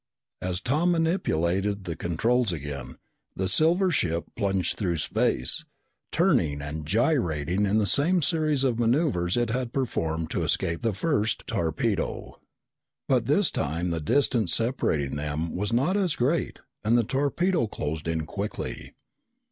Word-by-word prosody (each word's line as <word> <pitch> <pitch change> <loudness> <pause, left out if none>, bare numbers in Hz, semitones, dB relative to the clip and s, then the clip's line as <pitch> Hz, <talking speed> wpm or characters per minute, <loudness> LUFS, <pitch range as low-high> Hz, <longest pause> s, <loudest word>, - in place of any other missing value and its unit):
As 90 0 -2
Tom 155 +9 +2
manipulated 100 - 0
the 85 -3 -4
controls 110 - +1
again, 70 -5 -6 0.4
the 95 - -1
silver 170 - +3
ship 85 - 0
plunged 95 -2 0
through 90 -5 -1
space, 65 -4 +1 0.5
turning 75 -2 +2
and 75 +1 -5
gyrating 100 - +1
in 100 +2 +2
the 105 - +2
same 165 - +2
series 155 -2 +2
of 120 -3 +1
maneuvers 120 - +1
it 120 -2 +1
had 125 0 -2
performed 80 - -2
to - - -1
escape 85 0 0
the 115 -4 0
first 110 - 0
torpedo. 80 -2 -2 0.7
But - - +2
this - - +3
time 85 +5 -2
the 80 -1 -2
distance 120 - +2
separating 80 - 0
them 75 +2 -3
was 100 +4 -1
not 135 +11 +2
as 185 -7 +1
great 145 +7 0 0.3
and 115 +3 +3
the 120 - +3
torpedo 145 - +1
closed 80 -6 -4
in 80 -1 -1
quickly. 100 +6 -5
105 Hz, 140 wpm, -26 LUFS, 80-135 Hz, 0.7 s, silver